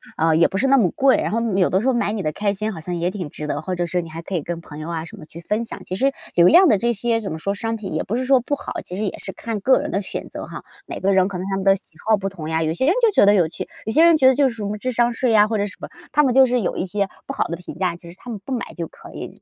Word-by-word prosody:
啊， 160 0 +2
也 170 - +5
不 195 - -3
是 270 - +2
那 275 0 +5
么 190 -8 +3
贵， 270 -1 +3
然 - - -1
后， 230 - +1
嗯， 220 -5 -1
有 180 - +3
的 190 +2 +2
时 255 - -1
候 260 - +3
买 220 -3 0
你 210 - -2
的 155 -2 -1
开 200 +4 -1
心 215 +2 -3
好 165 - -7
像 175 +2 -4
也 175 +2 0
挺 180 -7 -6
值 150 - -6
得， 145 +1 -3
或 185 - -3
者 175 -1 -1
是 175 0 -1
你 160 - -10
还 165 +1 -6
可 185 +2 -5
以 155 - -1
跟 170 -1 -5
朋 150 -2 -11
友 155 +2 -6
啊 165 -1 -3
什 215 +5 -12
么 155 - -11
去 165 - -12
分 210 +6 -1
享。 - - -8
其 185 - -4
实， 270 +5 +1 0.2
流 170 0 +6
量 360 - +7
的 210 - +4
这 235 +3 0
些 230 +2 0
怎 205 - -5
么 160 - -5
说， 200 +4 -2
商 225 +2 -2
品 205 -3 -6
也 - - 0
不 220 - -3
是 255 +1 -1
说 265 -1 +5
不 285 +4 -2
好， - - -8
其 180 - -8
实 210 - -2
也 200 - -3
是 195 - -7
看 225 -3 -4
个 260 +6 +4
人 - - -4
的 195 +1 -1
选 - - -6
择 - - -7
哈。 - - -9 0.2
每 - - -6
个 195 0 +2
人 190 0 +4
可 185 -3 -5
能 190 - -4
他 195 - -1
们 195 - -2
的 195 0 +6
喜 165 - -15
好 220 - +6
不 195 -1 -3
同 165 -5 -8
呀， 160 0 0
有 160 0 0
些 260 - 0
人 335 - +4
就 460 - +5
觉 205 - +5
得 205 - +6
有 175 -5 +3
趣， - - -7 0.2
有 220 - -2
些 320 +6 +5
人 335 -1 +7
觉 260 -3 +5
得 260 - +6
就 280 -1 +4
是 230 - -8
什 215 - -6
么 210 +1 -3
智 255 +4 -3
商 240 0 +2
税 245 0 0
呀， 210 -1 +5
或 220 -1 -1
者 205 - 0
什 200 - -9
么。 - - -6 0.2
他 295 - +4
们 265 -4 +3
就 265 0 +8
是 250 -1 +1
有 175 - -2
一 180 - -1
些 200 +1 -1 0.2
不 - - -5
好 - - 0
的 170 - -4
评 180 - -9
价， 180 -3 0
其 170 0 -12
实 - - -14
他 245 - -10
们 215 -4 -5
不 265 - -4
买 240 - -4
就 165 -2 -3
可 - - -14
以。 - - -9
200 Hz, 400 characters per minute, -21 LUFS, 175-235 Hz, 0.2 s, 就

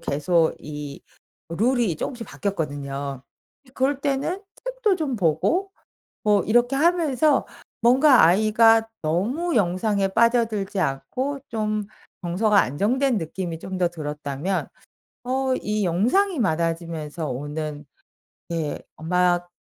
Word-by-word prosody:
계속 160 +3 +1
이 145 -1 -8 0.5
룰이 225 - +1
쪼금씩 240 - -5
바뀌었거든요. 140 -7 -4 0.4
예 255 - -19
그럴 270 +1 0
때는 285 +7 -1 0.2
책도 - - 0
좀 290 -7 -2
보고 230 - +1 0.5
뭐 210 -2 +3
이렇게 240 +4 +2
하면서 310 -2 +2 0.3
뭔가 255 - +6
아이가 225 +5 +4
너무 235 - -1
영상에 195 +1 +1
빠져들지 225 -2 +1
않고 255 - -2
좀 215 -2 -2 0.4
정서가 200 +4 +2
안정된 235 - +1
느낌이 165 -1 -4
좀 190 +1 -6
더 180 -1 +2
들었다면 150 +2 -3 0.6
어 260 +1 0
이 210 -1 -1
영상이 255 - +2
많아지면서 165 - -2
오는 145 +3 -5 0.7
네 165 -3 -2 0.2
막 175 +1 +1
200 Hz, 235 characters per minute, -23 LUFS, 165-255 Hz, 0.7 s, 뭔가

